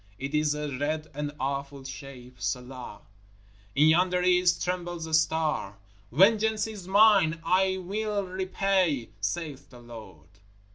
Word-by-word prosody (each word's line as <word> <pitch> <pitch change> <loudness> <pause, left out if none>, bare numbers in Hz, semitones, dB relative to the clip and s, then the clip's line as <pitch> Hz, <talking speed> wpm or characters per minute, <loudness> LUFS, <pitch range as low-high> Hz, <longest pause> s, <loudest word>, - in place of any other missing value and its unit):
It 135 +4 -5
is 150 -1 +1
a 150 -2 -4
red 155 +2 -2
and 145 +1 -4
awful 140 0 -3
shape. 130 -2 -10
Selah! 125 +4 -5 0.7
In 150 +3 +5
yonder 180 +2 +3
East 180 -1 +3
trembles 175 -2 -3
a 160 - -7
star. 155 -10 +1 0.3
_Vengeance 215 - +3
is 205 -5 -9
mine; 195 -5 +5
I 190 +2 +2
mill 205 +2 -2
repay, 185 - 0
saith 140 +6 -4
the 125 - -14
Lord! 110 -10 -12
160 Hz, 130 wpm, -27 LUFS, 135-185 Hz, 0.7 s, In